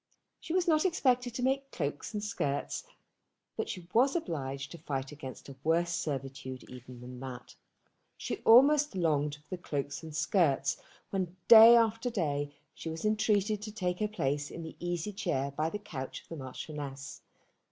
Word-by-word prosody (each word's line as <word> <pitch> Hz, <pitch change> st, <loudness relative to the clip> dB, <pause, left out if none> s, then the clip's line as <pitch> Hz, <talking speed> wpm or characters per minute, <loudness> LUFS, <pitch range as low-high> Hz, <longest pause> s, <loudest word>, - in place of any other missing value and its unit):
She -, -, -7 dB
was 360 Hz, 0 st, +2 dB
not 310 Hz, -2 st, +4 dB
expected 250 Hz, -, +1 dB
to 250 Hz, -, -2 dB
make 270 Hz, +1 st, +1 dB
cloaks 145 Hz, -, -3 dB
and 210 Hz, -2 st, -3 dB
skirts, 145 Hz, -9 st, -2 dB, 0.7 s
but -, -, -3 dB
she 180 Hz, -2 st, -6 dB
was 260 Hz, +6 st, +4 dB
obliged 140 Hz, -, -3 dB
to 170 Hz, -, -9 dB
fight 135 Hz, -3 st, -3 dB
against 135 Hz, -3 st, -9 dB
a 140 Hz, -, -9 dB
worse 170 Hz, +2 st, +2 dB
servitude 135 Hz, -4 st, -4 dB
even 125 Hz, -1 st, -11 dB
than 125 Hz, 0 st, -9 dB
that. 130 Hz, -1 st, -8 dB, 0.6 s
She -, -, -3 dB
almost 280 Hz, +3 st, +6 dB
longed 150 Hz, -4 st, +1 dB
for 150 Hz, 0 st, -22 dB
the 180 Hz, -1 st, -4 dB
cloaks 140 Hz, -3 st, -3 dB
and 160 Hz, -2 st, -8 dB
skirts 155 Hz, -4 st, +2 dB, 0.3 s
when 185 Hz, -2 st, -2 dB
day 230 Hz, +1 st, +11 dB
after 230 Hz, +1 st, +2 dB
day 145 Hz, -9 st, -1 dB, 0.2 s
she 165 Hz, -, -6 dB
was 160 Hz, +4 st, -5 dB
entreated 215 Hz, -1 st, +2 dB
to 215 Hz, 0 st, -6 dB
take 180 Hz, -4 st, -2 dB
her 215 Hz, -, +1 dB
place 145 Hz, -8 st, -1 dB
in 165 Hz, -, -7 dB
the 160 Hz, -, -8 dB
easy 175 Hz, +3 st, -3 dB
chair 165 Hz, -9 st, -1 dB
by 155 Hz, +3 st, -1 dB
the 210 Hz, -, -4 dB
couch 145 Hz, -11 st, -7 dB
of -, -, -28 dB
the 165 Hz, -, -6 dB
Marchioness. 135 Hz, 0 st, -7 dB
165 Hz, 175 wpm, -31 LUFS, 140-215 Hz, 0.7 s, day